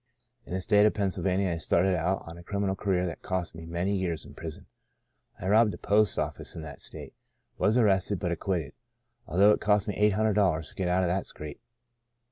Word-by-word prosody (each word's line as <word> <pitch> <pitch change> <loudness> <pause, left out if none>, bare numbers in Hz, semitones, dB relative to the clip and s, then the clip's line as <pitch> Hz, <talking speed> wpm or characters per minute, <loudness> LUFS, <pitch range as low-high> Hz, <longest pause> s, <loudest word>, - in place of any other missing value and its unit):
In - - -6
the 95 - -2
state 105 +2 +5
of - - 0
Pennsylvania 95 -1 0
I 85 - -2
started 85 +3 +2
out 90 +3 0
on 80 - -9
a 85 - -11
criminal 100 +1 -1
career 95 -2 0
that 85 - -5
cost 95 -2 -3
me 80 0 -9
many 90 +4 -1
years 85 -5 -2
in - - -12
prison. 80 -2 -8 0.7
I - - -4
robbed 110 +1 +4
a - - -10
post 105 -1 +2
office - - -3
in 80 - -6
that 70 -2 -9
state, - - -8 0.5
was 110 +4 +3
arrested, 100 -3 +3
but 90 -1 -2
acquitted, 85 -4 -2 0.5
although 100 +4 +5
it - - +1
cost 105 -1 +2
me 105 - -1
eight 105 0 +3
hundred 110 +1 +2
dollars 90 -6 +1
to - - -14
get 95 - -1
out 90 +1 +2
of 90 - +1
that 95 +2 -1
scrape. 75 +7 -8
95 Hz, 215 wpm, -28 LUFS, 85-100 Hz, 0.7 s, state